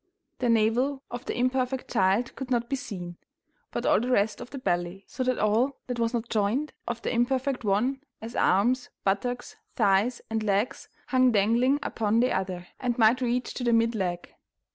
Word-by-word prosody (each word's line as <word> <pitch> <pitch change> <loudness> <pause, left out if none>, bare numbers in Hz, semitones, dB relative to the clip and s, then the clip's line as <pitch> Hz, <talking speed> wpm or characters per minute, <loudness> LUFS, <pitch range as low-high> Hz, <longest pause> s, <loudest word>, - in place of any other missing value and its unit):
The 245 - +1
navel 240 +5 +2
of 245 +1 -6
the - - -3
imperfect 255 +1 0
child 195 +6 +2
could 265 -1 -6
not 240 -2 +1
be 275 - -1
seen, 180 -10 -7 0.5
but - - -4
all - - +4
the 245 +3 -2
rest 210 -3 +1
of - - -8
the 280 - -7
belly, 175 -4 -2
so 260 - -3
that 255 -1 +1
all 225 +6 +2
that 245 -1 -4
was 230 0 +1
not 235 -1 -2
joined 225 +8 0
of 235 0 -4
the - - -1
imperfect 255 +2 0
one, 230 +7 +1 0.2
as 225 +1 -8
arms, 245 +7 +2
buttocks, 245 +6 -1 0.2
thighs, 215 +1 +2
and 220 0 -1
legs, 210 +3 -1 0.2
hung 255 -1 +4
dangling 235 +6 +3
upon 220 -3 0
the 250 +2 +3
other, 185 -2 -2
and 245 -2 -1
might 230 +2 +4
reach 245 0 -1
to 250 - -5
the 240 -1 +2
mid 230 0 +3
leg. 180 -5 -3
235 Hz, 185 wpm, -27 LUFS, 205-255 Hz, 0.5 s, all